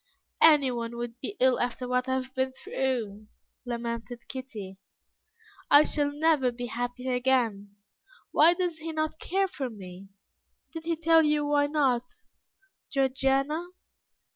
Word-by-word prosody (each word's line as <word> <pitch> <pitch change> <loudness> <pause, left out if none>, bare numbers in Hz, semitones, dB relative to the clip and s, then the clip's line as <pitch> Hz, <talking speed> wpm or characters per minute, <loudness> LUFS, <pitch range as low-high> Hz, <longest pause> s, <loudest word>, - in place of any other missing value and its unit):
"Anyone 250 -7 +4
would 240 0 -6
be 400 - -6
ill 260 -1 +4
after 245 +1 -2
what 250 +1 0
I 260 - +1
have 260 0 -4
been 260 0 -1
through," 230 -7 -3 0.4
lamented 235 0 -5
Kitty; 215 -8 -8 0.9
"I 290 +1 +8
shall 290 -2 0
never 295 -4 +2
be 245 +1 -6
happy 245 +2 -4
again. 245 -6 0 0.6
Why 335 +3 +5
does 345 -3 -2
he 325 0 -5
not 310 0 -2
care 390 +2 0
for 275 -8 -4
me? 190 -3 -11 0.7
Did 325 -1 -7
he 335 0 0
tell 325 0 +4
you 300 -1 +1
why 290 0 +2
not, 270 -5 +1 0.8
Georgiana? 275 +4 0
260 Hz, 135 wpm, -28 LUFS, 240-300 Hz, 0.9 s, I